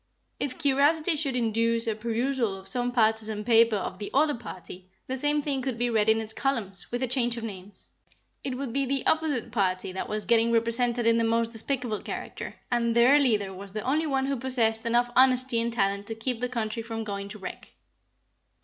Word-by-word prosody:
If 275 -3 -3
curiosity 305 +3 +2
should 285 -4 -1
induce 230 0 +1
a 225 - 0
perusal 230 0 -1
of 190 0 -13
some 245 +4 -1
partisan 220 -2 +1
paper 230 -1 +5
of 190 -2 -4
the 205 - -5
other 295 +2 +4
party, 185 -5 -10 0.2
the 260 - -3
same 290 +2 0
thing 275 -2 -1
could 255 -2 -3
be 240 0 0
read 220 -1 +2
in 220 0 +4
its 220 0 -2
columns, 225 -9 0
with 245 +2 -2
a - - 0
change 245 -1 +1
of 230 - -5
names. 195 -2 -8 0.6
It 260 -2 -3
would 265 -3 -4
be 275 +1 +1
the 275 0 -1
opposite 300 -8 +1
party 185 -4 0
that 190 - -5
was 215 0 -2
getting 235 0 +3
represented 235 +1 +1
in 230 0 +4
the - - +2
most 230 0 +1
despicable 230 -1 -1
character, - - -6 0.2
and 235 -1 +1
their 250 +5 +6
leader 210 -8 +1
was 195 +1 -9
the 215 - -4
only 305 +5 0
one 270 -2 0
who 275 0 -1
possessed 230 -3 +1
enough 240 +1 +2
honesty 255 -2 +4
and 235 +1 -1
talent 200 -2 -1
to 225 - -2
keep 225 +1 -2
the 250 +1 -2
country 230 -2 -3
from 225 0 -5
going 200 -1 -5
to 215 - -8
wreck. 190 - -9
230 Hz, 205 wpm, -27 LUFS, 220-260 Hz, 0.6 s, their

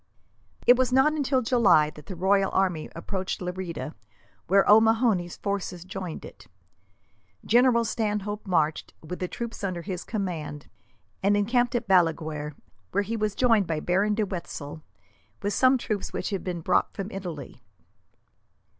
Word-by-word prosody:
It 245 - +7
was 255 -1 +2
not 265 +4 +4
until 275 -4 +1
July 205 -11 +4
that 150 -2 -14
the 190 - -6
royal 195 +2 +2
army 180 -5 0
approached 185 +3 -4
Lerida, 180 -3 -5 0.5
where 195 +2 +4
O'Mahony's 220 -4 +4
force 200 -2 -2
joined 185 -2 -6
it. - - -13 1.0
General 240 0 +4
Stanhope 210 -1 -2
marched, 160 -4 0
with 180 +3 -6
the 180 - -2
troops 235 +2 -6
under 180 -3 -3
his 185 -2 -5
command, 165 -9 -4 0.5
and 205 +1 +3
encamped 245 +4 +1
at 240 - -1
Balaguer; 160 -5 +1 0.3
where 200 +2 0
he 225 +3 -3
was 215 -2 -1
joined 230 -7 +3
by 160 -2 -1
Baron 195 +6 +1
de 215 -1 +1
Wetzel, 165 -5 -6 0.6
with 205 +1 0
some 260 +3 +4
troops 215 -5 -3
which - - -3
had 195 - -2
been 175 -2 -4
brought 180 - +2
from 195 +1 -5
Italy. 165 -10 -7
195 Hz, 145 wpm, -26 LUFS, 175-220 Hz, 1.0 s, It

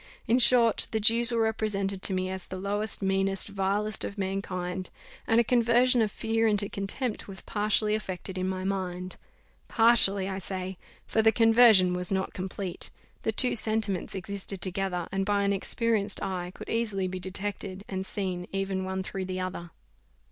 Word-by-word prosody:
In 240 +3 +3
short, 240 -2 +6
the 220 - -1
Jews 230 +2 +4
were 230 -1 +1
represented 200 -3 -1
to 190 - +2
me 185 0 -1
as 190 -1 -6
the 185 - -6
lowest, 205 +2 -1
meanest, 195 +1 +1
vilest 200 +2 -1
of 200 - -5
mankind, 185 -2 -3 0.4
and 225 - +4
a - - +5
conversion 240 +1 +3
of 215 -2 +1
fear 225 0 0
into 205 -2 +1
contempt 210 +4 -3
was 190 -2 -7
partially 210 0 0
effected 190 -3 -4
in 185 0 -1
my 185 0 -3
mind; 185 -1 -3 0.5
partially, 220 -4 +4
I 190 0 -4
say, 185 0 -5 0.3
for 220 - +1
the 220 0 +5
conversion 225 -5 +6
was 180 +1 0
not 190 -1 -1
complete; 185 0 -3 0.3
the 220 - 0
two 250 +3 +2
sentiments 215 -5 -1
existed 195 +1 -3
together, 185 -1 -2
and 195 0 0
by 200 0 +1
an 200 0 +2
experienced 210 +1 -1
eye, 180 -2 -3
could - - -9
easily 215 -5 -1
be 185 0 -5
detected 195 +1 -5
and 190 -1 -3
seen 185 -2 -4
even 195 -1 -2
one 190 0 -3
through 190 0 -5
the 185 0 -4
other. 185 -2 -5
195 Hz, 170 wpm, -28 LUFS, 190-220 Hz, 0.5 s, short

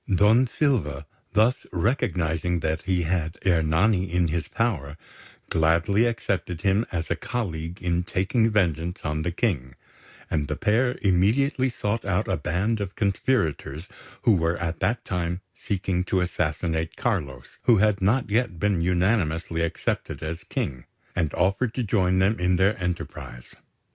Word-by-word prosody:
Don 105 +7 +5
Silva, 90 - 0 0.3
thus 110 +4 +2
recognising 90 - 0
that 80 +1 -1
he 90 -2 +1
had 80 -1 -1
Ernani 90 +2 +2
in 90 -1 +2
his 85 +1 -2
power, 80 - -1 0.5
gladly 85 +7 +3
accepted 95 -7 -2
him 100 +2 +2
as 85 -1 -3
a - - +3
colleague 85 -5 -4
in 85 -1 +1
taking 95 +6 +1
vengeance 90 -5 0
on 75 0 -1
the 90 - -1
King; 75 - -1 0.5
and 75 -2 -1
the - - -2
pair 125 +4 +1
immediately 120 +9 +3
sought 115 -1 -2
out 100 +1 0
a 95 - +1
band 90 +8 -1
of 100 -1 -4
conspirators 95 - -1 0.4
who 110 - +5
were 80 0 +1
at 80 -1 -3
that 120 - 0
time 90 -1 -2
seeking 95 -2 -2
to 95 - +1
assassinate 80 -2 -1
Carlos, 75 - -3
who 120 - +6
had 105 -1 +2
not 110 +7 +2
yet 110 -4 0
been 100 -3 +1
unanimously 85 -3 +1
accepted 85 -1 -2
as 80 +2 -5
King, 65 -3 -3 0.3
and 80 -5 0
offered 100 +6 +1
to 125 - 0
join 95 -4 +2
them 95 +3 +2
in 90 0 +2
their 95 +4 +3
enterprise. 85 -8 -5
90 Hz, 150 wpm, -25 LUFS, 80-105 Hz, 0.5 s, who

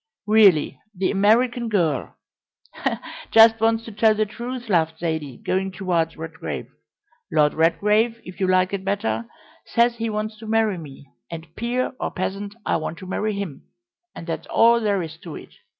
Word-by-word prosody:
"Really, 205 -7 +4 0.2
the 185 +1 0
American 235 +4 +2
girl 165 - 0 0.6
" - - -5
"Just 225 0 +7
wants 225 0 +2
to 225 - -8
tell 215 +1 +3
the 215 0 +1
truth," 240 +3 -6
laughed 160 -5 +1
Zaidie, 160 -6 -3
going 190 +1 -1
towards 175 -3 -1
Redgrave. 160 +1 -6 0.6
"Lord 150 -1 +3
Redgrave, 210 +8 +2
if 180 +2 -10
you 190 - +1
like 185 +1 +2
it 195 -1 -2
better, 205 +4 -1 0.4
says 235 0 +2
he 230 0 -2
wants 215 0 -4
to 225 - -9
marry 220 -4 +1
me, 140 -3 -11 0.2
and, 165 -1 -9
peer 245 +3 -1
or - - -1
peasant, 200 +2 -4
I - - +1
want 155 +1 -5
to 185 - -10
marry 210 +3 -2
him, 200 -8 -6 0.5
and - - -8
that's 165 -1 -5
all 235 +1 +5
there 205 -4 0
is 160 0 -8
to 165 -2 -9
it. - - -11
200 Hz, 170 wpm, -23 LUFS, 165-225 Hz, 0.6 s, Just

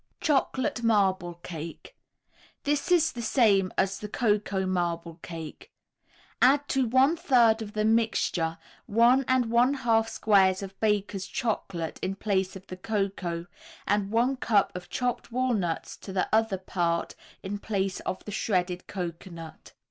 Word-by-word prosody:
CHOCOLATE 275 -3 0
MARBLE 190 -6 +2
CAKE 170 - -8 0.7
This 290 +4 0
is 320 -3 +4
the 240 - -6
same 210 -5 +3
as 195 0 +1
the 210 - -6
Cocoa 205 -4 0
Marble 170 -2 -2
Cake. 165 -2 -9 0.7
Add 285 +3 +5
to 265 -2 +1
one 260 +7 +4
third 240 -9 +4
of 210 -1 -7
the 215 0 0
mixture 215 -7 +1 0.3
one 235 +5 +4
and 255 -3 +2
one 245 +4 +4
half 225 -4 +2
squares 195 -3 +3
of 195 0 -9
Baker's 205 -2 0
Chocolate 195 -8 -3
in 195 - -2
place 190 -2 -1
of 190 0 -10
the 185 - -8
cocoa, 190 -4 -2 0.4
and 205 -1 +1
one 240 +5 +1
cup 210 -7 +2
of 180 -1 -7
chopped 245 -1 -2
walnuts 230 -9 -1
to 195 - -9
the 190 -1 0
other 220 -3 +2
part 170 -2 -1 0.3
in 200 +1 -4
place 195 -3 -2
of 185 - -5
the 210 - -6
shredded 180 -3 -1
cocoanut. 170 -2 -7
205 Hz, 145 wpm, -27 LUFS, 185-235 Hz, 0.7 s, Add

